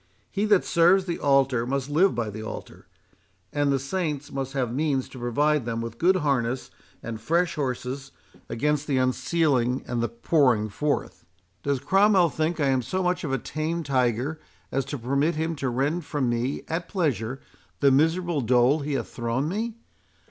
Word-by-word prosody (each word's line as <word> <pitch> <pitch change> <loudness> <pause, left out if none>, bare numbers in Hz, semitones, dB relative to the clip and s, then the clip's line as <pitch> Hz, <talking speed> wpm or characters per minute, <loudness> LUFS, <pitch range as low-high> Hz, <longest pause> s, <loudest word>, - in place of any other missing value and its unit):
He 205 +1 0
that 205 -3 +4
serves 180 +3 +4
the 175 -2 -3
altar 135 -4 +2
must 135 0 -1
live 170 +7 +3
by 115 -3 -2
the 110 +2 -7
altar—and 110 - -6
the 135 - +3
saints 145 0 -3
must 135 0 -4
have 125 -4 -1
means 140 -2 0
to 130 - -10
provide 145 +4 +1
them 115 -1 -2
with 115 0 -6
good 185 +3 +4
harness 130 -6 0 0.3
and 110 -1 -6
fresh 170 +7 +1
horses 135 -1 -3 0.4
against 150 +4 0
the 140 -3 +1
unsealing 130 -1 +1
and 120 -1 -1
the 120 - 0
pouring 115 -3 +2
forth. 145 +8 -2 0.4
Does 140 -2 0
Cromwell 190 +4 +4
think 160 +3 -1
I 140 -2 +2
am 130 -1 +2
so 185 +10 -2
much 180 0 0
of 150 - -2
a 135 - +1
tame 155 +6 -3
tiger 130 +2 0 0.3
as 135 -1 0
to 145 - -4
permit 140 +7 0
him 160 +1 -1
to 135 -2 -1
rend 140 +8 0
from 145 -4 -1
me 120 +4 -2
at 165 +2 -3
pleasure 135 - -1 0.4
the 140 -1 +5
miserable 165 +3 +2
dole 125 +4 +3
he 145 0 -3
hath 125 -5 -2
thrown 120 +4 -2
me? 220 +6 -2
140 Hz, 175 wpm, -25 LUFS, 125-160 Hz, 0.4 s, the